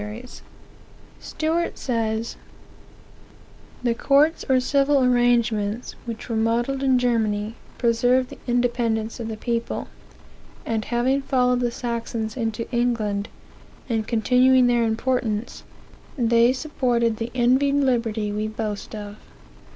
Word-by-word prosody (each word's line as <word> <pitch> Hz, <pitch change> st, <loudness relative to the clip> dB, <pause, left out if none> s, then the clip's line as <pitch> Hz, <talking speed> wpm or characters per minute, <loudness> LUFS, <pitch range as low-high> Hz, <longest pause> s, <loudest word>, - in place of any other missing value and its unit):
Stuart 325 Hz, +2 st, -2 dB
says: 225 Hz, -2 st, -2 dB, 1.5 s
"The 240 Hz, -1 st, +2 dB
courts, 285 Hz, +6 st, +3 dB
or 260 Hz, -1 st, +5 dB
civil 275 Hz, +1 st, +2 dB
arrangements, 240 Hz, -3 st, +1 dB
which 230 Hz, -1 st, -6 dB
were 230 Hz, -, -2 dB
modelled 235 Hz, +4 st, 0 dB
in 265 Hz, -2 st, +3 dB
Germany, 220 Hz, -3 st, 0 dB, 0.2 s
preserved 245 Hz, +2 st, +2 dB
the -, -, -10 dB
independence 240 Hz, -2 st, 0 dB
of 230 Hz, -, -4 dB
the 220 Hz, -1 st, -5 dB
people; 235 Hz, +1 st, -3 dB, 0.8 s
aud 220 Hz, -2 st, -2 dB
having 255 Hz, +3 st, +1 dB
followed 250 Hz, -2 st, +2 dB
the 245 Hz, -1 st, +1 dB
Saxons 230 Hz, -2 st, -4 dB
into 225 Hz, -2 st, -3 dB
England, 230 Hz, -4 st, 0 dB, 0.6 s
and 225 Hz, -3 st, -1 dB
continuing 255 Hz, +2 st, +4 dB
their 240 Hz, -1 st, +3 dB
importance, 225 Hz, -1 st, -1 dB, 0.6 s
they 235 Hz, 0 st, +4 dB
supported 245 Hz, -5 st, 0 dB
the 230 Hz, +1 st, -4 dB
envied 260 Hz, +3 st, +3 dB
liberty 230 Hz, -6 st, 0 dB
we 210 Hz, +1 st, -2 dB
boast 215 Hz, -1 st, -5 dB
of. 205 Hz, 0 st, -8 dB
235 Hz, 110 wpm, -23 LUFS, 225-255 Hz, 1.5 s, or